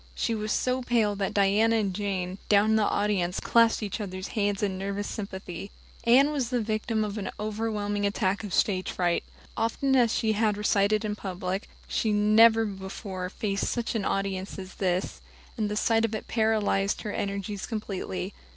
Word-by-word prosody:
She 230 - 0
was 215 -1 -2
so 255 0 +1
pale 230 -4 +1
that 195 -1 -1
Diana 205 +3 +3
and 205 -4 0
Jane, 190 -1 -3
down 210 +1 +5
in - - +4
the 215 -1 +3
audience, 195 -5 0
clasped 230 -1 +3
each 205 +1 -3
other's 185 -1 -5
hands 205 -2 0
in 195 -2 0
nervous 200 +2 -3
sympathy. 195 -2 -6 0.4
Anne 265 +5 +6
was 270 -6 -1
the 250 -1 0
victim 215 0 -1
of 210 0 -3
an 195 - -3
overwhelming 210 -1 -2
attack 200 0 0
of 205 - -6
stage 185 -1 +1
fright. 175 -2 0 0.3
Often 265 +4 +1
as 240 -3 +4
she 220 -2 +1
had 210 -1 +1
recited 210 +1 +2
in 210 -1 -2
public, 190 0 -4 0.2
she 220 - 0
had 210 - +2
never 225 +2 +6
before 190 -2 -5
faced 200 0 -2
such 240 -2 -1
an 220 -3 -1
audience 195 -1 -2
as 185 -1 -8
this, 185 -1 -1 0.3
and 215 -3 -1
the 210 - -2
sight 225 +1 +2
of 225 -1 0
it 215 - -6
paralyzed 215 -3 +1
her 210 - -3
energies 200 0 -3
completely. 195 -3 -4
205 Hz, 180 wpm, -27 LUFS, 195-220 Hz, 0.4 s, Anne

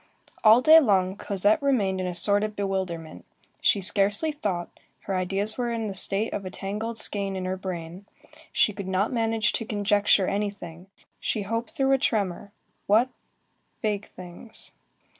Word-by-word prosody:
All 220 +2 +7
day 315 +1 +9
long, 190 -8 +2
Cosette 205 +2 +1
remained 205 -9 +1
in 185 - -2
a 180 - -4
sort 200 +4 +4
of 215 0 -3
bewilderment. 190 -5 -4 0.4
She 200 - +3
scarcely 205 - +2
thought, 195 -12 -4 0.2
her 195 - -3
ideas 195 +5 -1
were 240 -1 -1
in 230 -1 -2
the 205 - -4
state 195 +3 +2
of 200 - -3
a 185 - -5
tangled 210 +4 -5
skein 200 -2 -1
in 185 -1 -4
her 185 0 -2
brain, 185 0 -7 0.4
she 210 - +2
could 195 -1 -7
not 190 +5 0
manage 225 -2 +1
to - - -2
conjecture 205 -2 +2
anything, 195 -4 -4 0.3
she 210 - -2
hoped 230 +6 -3
through 270 -4 0
a 270 - +4
tremor, 200 -5 -1 0.4
what? 225 +5 +4 0.7
vague 210 -2 -1
things. 180 +5 -8
200 Hz, 160 wpm, -26 LUFS, 190-220 Hz, 0.7 s, day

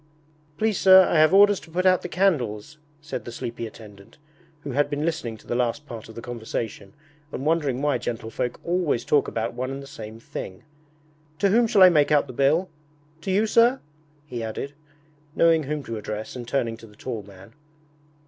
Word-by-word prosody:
'Please 215 +1 0
sir, 190 0 +8
I 160 - +2
have 155 +1 +6
orders 205 0 +6
to - - -16
put 180 +3 -1
out 185 -1 +4
the 180 - -6
candles,' 150 - 0 0.2
said 150 - -6
the 120 - -8
sleepy 115 0 -5
attendant, 105 -3 -14 0.4
who 145 - -6
had 145 +3 +1
been 145 +1 -2
listening 160 -9 -3
to - - -20
the - - -3
last 125 +4 -1
part 115 -5 -9
of 110 - -12
the 115 - -8
conversation 115 -4 -5 0.4
and 135 - -5
wondering 145 -5 0
why 145 -4 +1
gentlefolk 115 +1 -4
always 170 -8 0
talk 145 - +2
about 110 0 -3
one 130 +2 -3
and 135 +1 -6
the - - -10
same 115 -6 -9
thing. 95 -4 -8 0.7
'To 200 - +2
whom 230 +4 +4
shall 200 -3 +5
I 185 - +10
make 150 -4 +3
out 150 -1 +4
the 130 - -10
bill? 145 +8 +2 0.5
To 195 - -5
you, 200 +3 +3
sir?' 235 +4 +4 0.5
he 125 -5 -6
added, 115 +5 -5 0.6
knowing 165 -1 +4
whom 150 +1 -3
to 115 -3 -5
address 105 +2 -6
and 120 -2 -7
turning 115 -3 -1
to 115 - -13
the 105 - -19
tall 115 -1 -5
man. 100 +1 -15
140 Hz, 195 wpm, -24 LUFS, 115-165 Hz, 0.7 s, I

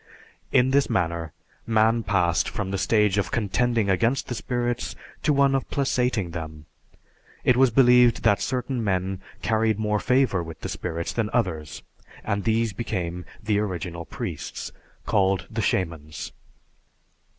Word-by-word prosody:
In 125 +1 +4
this 140 +1 +3
manner, 85 -3 -1 0.4
man 110 +1 +3
passed 90 -6 +1
from 105 -5 -4
the 100 - -1
stage 105 -3 +3
of 100 - -1
contending 115 +1 +1
against 115 +7 +1
the - - -1
spirits 120 0 -2 0.3
to - - +2
one 140 -1 +4
of 135 - -1
placating 125 - 0
them. 80 -2 -7 0.8
It 125 - +4
was 130 +1 +5
believed 125 -1 +5
that 100 -4 +3
certain 125 -1 -2
men 95 -1 -1 0.2
carried 110 -1 +2
more 105 -1 0
favor 125 -8 +2
with 80 -1 -9
the - - -4
spirits 85 +1 -4
than 115 -3 -1
others, 80 -10 -2 0.4
and 100 0 -2
these 115 -1 +1
became 90 -6 -3 0.2
the 105 -1 +1
original 85 -4 -4
priests, 100 - -6 0.3
called 95 -2 +2
the 110 0 -2
"Shamans." 80 -6 -2
105 Hz, 140 wpm, -25 LUFS, 90-120 Hz, 0.8 s, was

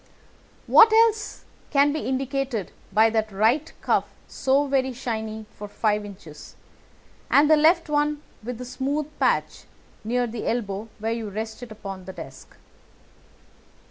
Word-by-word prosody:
"What 450 0 +7
else 445 -1 +2 0.2
can 285 0 +3
be 310 - -2
indicated 265 -4 -2 0.2
by 220 +1 +4
that 220 -1 0
right 225 +10 +2
cuff - - +2 0.2
so 275 +2 +1
very 265 -2 0
shiny 220 -3 -4
for 210 - -9
five 210 0 0
inches, 175 -7 -11 0.7
and 290 +2 +5
the 310 - +6
left 330 +3 +4
one 295 0 0 0.2
with 240 +2 -6
the 250 - -7
smooth 275 +4 -2
patch - - 0 0.4
near 245 +3 0
the 230 -1 -5
elbow 215 -2 -2
where 220 +1 -2
you 225 -2 -4
rest 220 +3 -5
it 245 -2 -9
upon 195 -3 -8
the 190 - -8
desk?" 150 -7 -11
240 Hz, 140 wpm, -24 LUFS, 215-280 Hz, 0.7 s, What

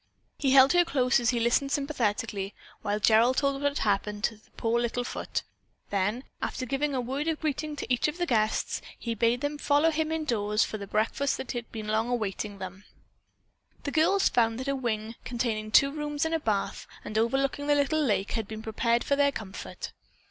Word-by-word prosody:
He 275 - +2
held 270 +2 +7
her 350 0 +6
close 260 -6 +2
as 235 -1 +1
he 240 - +1
listened 240 +4 +2
sympathetically 220 -8 -1 0.3
while 205 +1 -1
Gerald 230 +4 +4
told 275 -1 +1
what 285 - +3
had 285 - -3
happened 205 +1 0
to 225 - +1
the 215 - -26
poor 230 +1 +1
little 240 +1 -1
foot. - - -3 0.5
Then, 205 +5 0 0.2
after 255 - -3
giving 275 +3 -1
a - - +1
word 265 +5 -2
of 320 -2 0
greeting 305 0 -2
to 255 -3 -2
each 245 - +2
of 300 +2 -3
the 350 - 0
guests, 220 -7 0 0.2
he 235 - -3
bade 230 +2 +1
them 290 0 -2
follow 295 +3 +3
him 315 0 -1
indoors 225 -10 +1
to 215 - -5
the 200 - -6
breakfast 225 +7 0
that - - -5
had 240 -2 -4
long 215 -1 -4
been 215 - -2
awaiting 215 -3 -1
them. 190 +1 -8 1.0
The 285 - -3
girls 330 +6 +4
found 225 -1 +2
that 260 - -5
a 275 - +1
wing, 225 -4 -2
containing 230 -3 -2
two 275 +5 +5
rooms 295 0 -2
and 320 - -1
a 325 - +2
bath, 215 -8 -2 0.2
and 215 - -6
overlooking 270 +5 +1
the 290 - +4
little 290 +2 +2
lake, 205 -8 +1
had 225 -3 -2
been 220 +1 -7
prepared 230 +2 +1
for 280 - +1
their 280 0 +3
comfort. 205 -7 -7
245 Hz, 205 wpm, -28 LUFS, 215-285 Hz, 1.0 s, held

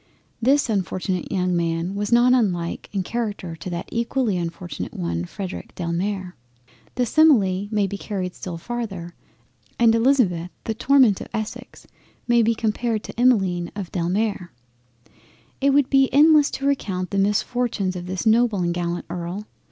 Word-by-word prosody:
This 275 +4 +3
unfortunate 185 -3 -2
young 180 -1 0
Man 170 +1 -1
was 205 +2 -3
not 240 +1 +5
unlike 180 -9 0
in 195 -2 -1
character 205 -6 -4
to 170 - -7
that 175 0 -4
equally 235 -2 0
unfortunate 170 -2 -5
one 85 -1 -2
Frederic 185 - -7
Delamere. 180 +2 -3 0.6
The 250 - +1
simile 210 -10 +4
may 210 -2 +1
be 200 +1 -5
carried 185 -4 -4
still 175 -2 -6
farther, 195 -4 -5 0.6
and 230 -1 +5
Elizabeth 225 -8 +2
the 225 - -2
torment 250 -3 +4
of - - -7
Essex 215 -1 -6 0.4
may 240 -1 +4
be 230 +1 +2
compared 220 0 -1
to - - -8
the - - -11
Emmeline 190 -9 +2
of 195 -4 -6
Delamere. 185 +1 -1 1.1
It 280 - +4
would 280 -1 +4
be 270 -1 +4
endless 300 0 +6
to 275 - -5
recount 190 -10 -1
the 200 - 0
misfortunes 205 -1 0
of 180 0 -6
this 185 +3 -4
noble 225 -1 +3
and 170 0 0
gallant 175 0 -3
Earl. 175 +4 -5
200 Hz, 155 wpm, -23 LUFS, 180-235 Hz, 1.1 s, endless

